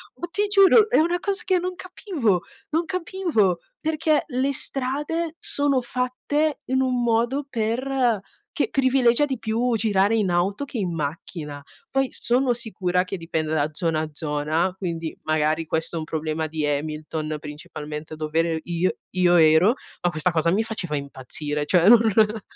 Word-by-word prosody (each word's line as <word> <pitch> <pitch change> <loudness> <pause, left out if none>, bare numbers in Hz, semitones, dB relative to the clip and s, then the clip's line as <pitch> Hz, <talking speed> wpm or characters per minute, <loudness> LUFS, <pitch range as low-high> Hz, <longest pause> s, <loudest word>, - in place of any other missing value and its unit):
Ma 345 - -5
ti 415 +2 +1
giuro, 410 +2 +6
è - - +3
una 345 +2 +2
cosa 400 +3 -2
che 370 -1 +2
non 365 +1 -3
capivo, 320 - -1 0.3
non 330 +2 +1
capivo, 335 - 0 0.2
perché 310 -1 +1
le 260 +3 0
strade 295 +5 -1
sono 285 -4 +1
fatte 255 +5 -1
in 260 0 +3
un 250 -2 0
modo 240 +5 +1
per 240 0 0 0.4
che - - 0
privilegia 260 0 +3
di 265 -4 -4
più 230 +2 0
girare 205 -1 +2
in 210 -4 +1
auto 185 +9 0
che 270 - -7
in 185 -5 -1
macchina. 150 -1 -5 0.3
Poi 270 -1 +1
sono 250 +1 +2
sicura 185 -6 -1
che 190 +1 -5
dipenda 160 -2 -2
da 150 0 +1
zona 160 0 0
a 155 - -4
zona, 155 +3 -1
quindi 165 -4 -4
magari 155 +1 +1
questo 160 +2 -2
è - - -1
un 155 - -5
problema 155 0 -2
di 155 0 -3
Hamilton, 155 +1 -2
principalmente 150 +1 -7
dov'ere 160 +1 0
io 175 +1 0 0.2
io 180 -1 +4
ero, 160 +6 +6 0.3
ma 175 - +3
questa 155 +3 +1
cosa 165 0 +1
mi 205 +5 +2
faceva 205 -9 -3
impazzire, 145 +2 -3
cioè 175 +2 +3
non 240 - +9
non 215 0 +3
205 Hz, 160 wpm, -24 LUFS, -, 0.4 s, non